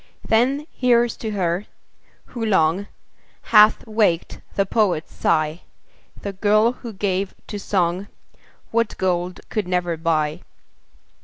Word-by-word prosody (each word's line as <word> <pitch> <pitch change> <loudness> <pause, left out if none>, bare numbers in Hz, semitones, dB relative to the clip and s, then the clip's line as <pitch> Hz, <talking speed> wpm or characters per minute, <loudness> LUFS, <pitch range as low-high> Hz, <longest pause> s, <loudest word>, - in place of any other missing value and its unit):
Then 260 +6 +2
here's 240 -2 +2
to 220 - -4
her, 180 0 -1 0.6
who 235 -2 -6
long 190 -2 +2 0.6
Hath 215 -1 +5
waked 215 -7 0
the 195 - +2
poet's 195 -6 0
sigh, 155 +1 0 0.6
The 200 - -4
girl 215 +4 +3
who 245 -2 -9
gave 195 -1 -2
to 205 - -6
song 185 -1 0 0.6
What 230 -1 0
gold 180 -1 -1
could 210 -4 -2
never 175 -2 -1
buy. 155 -1 0
195 Hz, 120 wpm, -22 LUFS, 175-220 Hz, 0.6 s, Hath